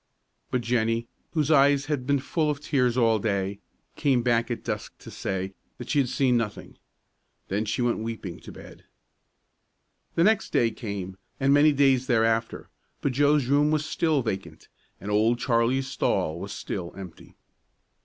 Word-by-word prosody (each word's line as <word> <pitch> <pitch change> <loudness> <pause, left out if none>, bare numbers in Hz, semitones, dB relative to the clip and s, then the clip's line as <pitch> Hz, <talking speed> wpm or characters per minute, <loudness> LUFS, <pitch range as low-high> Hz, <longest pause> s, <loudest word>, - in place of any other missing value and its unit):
But 125 - 0
Jennie, 115 -1 0 0.3
whose 155 -2 +1
eyes 140 -1 +4
had 145 -4 -3
been 140 0 +3
full 150 +3 -1
of 145 -1 -2
tears 125 -4 +1
all 115 -3 +3
day, 100 -1 -1 0.4
came 130 -4 +2
back 120 -1 +1
at 120 - -4
dusk - - -5
to - - -12
say 95 0 -3 0.2
that 125 - -6
she 145 - +3
had 130 -3 +1
seen 130 -1 +2
nothing. 115 -4 -3 0.7
Then 105 +3 -1
she 110 +3 -1
went 120 -1 +1
weeping 110 -6 -5
to - - -11
bed. - - -13 1.3
The 165 - +3
next 220 +2 +3
day 115 -1 +2
came, 100 -4 -6 0.2
and 135 0 +3
many 145 +1 +6
days 135 -2 +3
thereafter; 115 -1 +1 0.3
but 140 - 0
Joe's 145 +1 +3
room 145 +3 +3
was 155 0 0
still 155 -4 +1
vacant, 95 -7 -5 0.3
and 105 - -5
Old 110 +3 +3
Charlie's 120 +2 +1
stall 85 -10 -1
was 100 +2 -6
still 90 -3 -5
empty. 95 -4 -11
120 Hz, 165 wpm, -26 LUFS, 110-140 Hz, 1.3 s, many